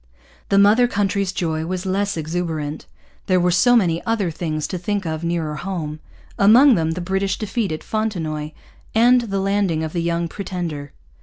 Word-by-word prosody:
The 195 - +3
mother 210 +5 +5
country's 200 -3 0
joy 160 -3 -2
was 185 +1 -3
less 195 0 -1
exuberant. 160 -2 -3 0.4
There 185 -1 +3
were 180 0 +2
so 245 +8 +4
many 170 -7 +2
other 215 -6 0
things 155 -2 -3
to 180 - -3
think 200 +2 -2
of 160 0 -3
nearer 165 -3 -2
home; 155 -4 -4 0.4
among 240 +7 +7
them 160 -5 +1
the 180 - -5
British 190 +2 -1
defeat 215 -1 -2
at 155 - -5
Fontenoy 165 -9 -2 0.5
and 245 +2 +5
the 200 -4 -3
landing 195 -5 0
of 155 - -4
the 170 - -1
Young 170 0 -1
Pretender. 170 -7 -5
180 Hz, 170 wpm, -21 LUFS, 160-200 Hz, 0.5 s, among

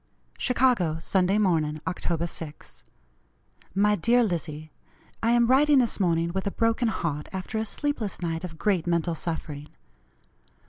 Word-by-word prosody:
"CHICAGO, 245 - +2
Sunday 185 +4 +1
Morning, 160 -7 +1
Oct. 170 0 -2
6. 160 -2 -9 0.9
"MY 210 +1 +4
DEAR 240 +7 +3
LIZZIE: 155 -6 -3 0.5
I 225 - +1
am 240 0 +4
writing 280 +4 +5
this 240 -4 +2
morning 170 -2 +1
with 190 +1 -2
a - - +2
broken 230 +3 +1
heart 150 -8 -2
after 190 +4 -4
a 220 - -1
sleepless 245 -3 -3
night 165 -1 -3
of 165 -3 -7
great 185 -3 0
mental 170 0 +1
suffering. 155 -3 -5
180 Hz, 140 wpm, -26 LUFS, 165-225 Hz, 0.9 s, writing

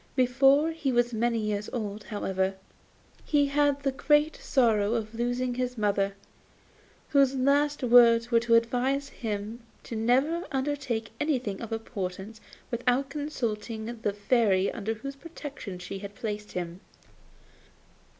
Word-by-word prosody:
Before 270 +4 +4
he 310 -4 -2
was 240 0 +2
many 230 +1 +1
years 210 -1 -2
old, 210 -3 -4
however, 190 -2 -1 0.7
he 290 -1 +3
had 285 0 +2
the 275 - +1
great 295 +3 +2
sorrow 225 -4 +2
of 220 -1 -3
losing 245 +2 -1
his 250 0 -3
mother, 200 -2 +1 0.9
whose 275 -2 +4
last 285 +2 +2
words 235 -1 +6
were 230 - +5
to 230 0 +3
advise 255 +4 +1
him 220 0 -5 0.3
never 255 +9 +2
to - - -9
undertake 265 -5 -2
anything 255 -10 -1
of 230 -1 -7
importance 215 -1 -5 0.3
without 250 +3 0
consulting 235 -6 -4
the 205 - +1
Fairy 205 -2 +2
under 225 0 -3
whose 275 +5 -7
protection 275 - -8
she 180 +2 -7
had 200 +1 -8
placed 210 -3 -5
him. 175 0 -4
235 Hz, 130 wpm, -28 LUFS, 210-275 Hz, 0.9 s, words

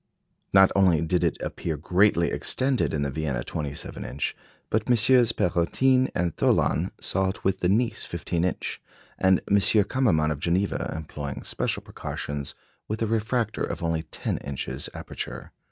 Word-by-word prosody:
Not 95 -1 +6
only 95 -5 +4
did 90 +2 +1
it 85 - +1
appear 80 -3 -3
greatly 90 +2 +3
extended 130 0 +1
in 75 -2 -1
the 70 - -2
Vienna 70 -4 -2
27 75 -3 -5
inch, 70 +3 -3 0.4
but 110 0 +1
MM. 120 0 +5
Perrotin 130 +10 +2
and 85 -2 0
Thollon 80 +7 +2
saw 95 -1 0
it 95 - -6
with 95 0 +1
the 90 - +1
Nice 115 +2 +1
15 85 0 -2
inch, 90 - -2 0.4
and 95 0 +4
M. 100 - +4
Kammermann 100 -6 +3
of 75 - -3
Geneva, 90 +5 0
employing 75 -3 -6
special - - -2
precautions, 70 -1 -5 0.3
with 110 +2 -2
a - - +2
refractor 110 0 -1
of 85 - -4
only 80 -1 0
ten 80 - -4
inches 70 -2 -5
aperture. - - -7
90 Hz, 155 wpm, -26 LUFS, 80-110 Hz, 0.4 s, Not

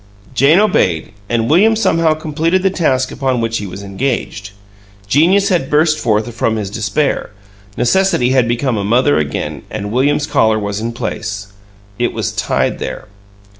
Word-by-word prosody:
Jane 140 +8 +4
obeyed, 95 - +1 0.2
and 115 -1 0
William 210 - +4
somehow 165 -7 +2
completed 160 +4 -1
the 195 - +2
task 130 -8 0
upon 130 -2 -1
which 115 0 -1
he 100 - -5
was 95 +2 -8
engaged. 100 -1 -3 0.6
Genius 175 - +3
had 170 -8 0
burst 155 +1 +2
forth 110 +1 0
from 115 0 0
his 105 -3 -4
despair; 115 +7 -1 0.5
necessity 130 -1 +2
had 130 -3 +3
become 120 0 0
a 100 - -2
mother 125 - +2
again, 75 -2 -3
and 105 0 -5
William's 145 +4 +1
collar 110 -7 +2
was 100 -1 -3
in 115 +2 -3
place. 105 -3 -5 0.5
It 120 - 0
was - - -2
tied - - -1
there. - - -6
125 Hz, 160 wpm, -16 LUFS, 110-155 Hz, 0.6 s, Jane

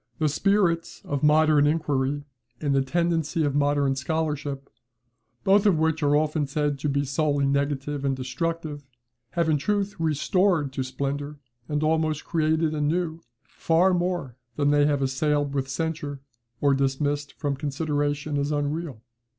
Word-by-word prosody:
The 155 -2 +1
spirit 175 0 +1
of 140 -1 -2
modern 150 -1 +5
inquiry, 145 -2 0 0.4
and 145 -2 0
the 135 - +3
tendency 165 +2 0
of 145 -2 0
modern 145 -1 +2
scholarship, 145 -1 -2 0.8
both 200 +2 +4
of 185 -5 +4
which 160 0 +1
are 145 0 +3
often 150 -1 +1
said 145 0 -1
to 150 - -1
be 140 0 0
solely 145 0 +1
negative 140 0 -1
and 135 -1 +1
destructive, 145 +3 -3 0.5
have, 170 -2 +1
in 155 -2 +2
truth, 205 +5 -1
restored 160 -1 +1
to 135 - -2
splendour, 140 +3 -3 0.3
and 150 0 0
almost 155 -1 +1
created 160 -1 +1
anew, 160 +2 -1 0.2
far 175 +3 +2
more 175 -8 -1 0.2
than 145 -1 +2
they 145 0 +4
have 145 -2 +1
assailed 145 +2 0
with 135 -1 -2
censure, 145 -1 -3 0.4
or 140 -1 +4
dismissed 145 +2 -1
from 145 -2 -2
consideration 145 0 -1
as 140 +1 -1
unreal. 145 -4 -3
145 Hz, 145 wpm, -25 LUFS, 140-160 Hz, 0.8 s, modern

